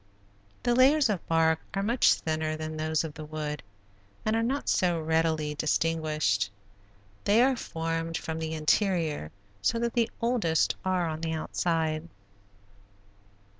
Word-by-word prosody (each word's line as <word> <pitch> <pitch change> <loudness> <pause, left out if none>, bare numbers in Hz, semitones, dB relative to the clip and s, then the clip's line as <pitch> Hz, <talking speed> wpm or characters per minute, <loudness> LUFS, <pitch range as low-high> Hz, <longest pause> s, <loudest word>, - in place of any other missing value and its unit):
The 240 - +2
layers 265 +2 +5
of 195 -6 -1
bark 160 -1 +3 0.2
are 195 - 0
much 235 +4 +4
thinner 155 -1 -2
than 155 0 -5
those 155 0 0
of 160 -2 -5
the 155 0 -8
wood 150 -2 -4 0.6
and 215 0 +2
are 225 - +2
not 265 +5 -1
so 175 -2 +2
readily 160 -1 +1
distinguished. 155 -9 0 0.7
They 205 +3 +4
are 265 0 +3
formed 165 -5 -3
from 160 0 -4
the 160 0 -3
interior 155 - +1 0.3
so 230 - +1
that 235 0 -1
the 235 -1 +2
oldest 230 -10 +1
are 185 -2 +1
on 155 0 -4
the 165 -1 -2
outside. 160 0 -1
165 Hz, 140 wpm, -28 LUFS, 155-200 Hz, 0.7 s, layers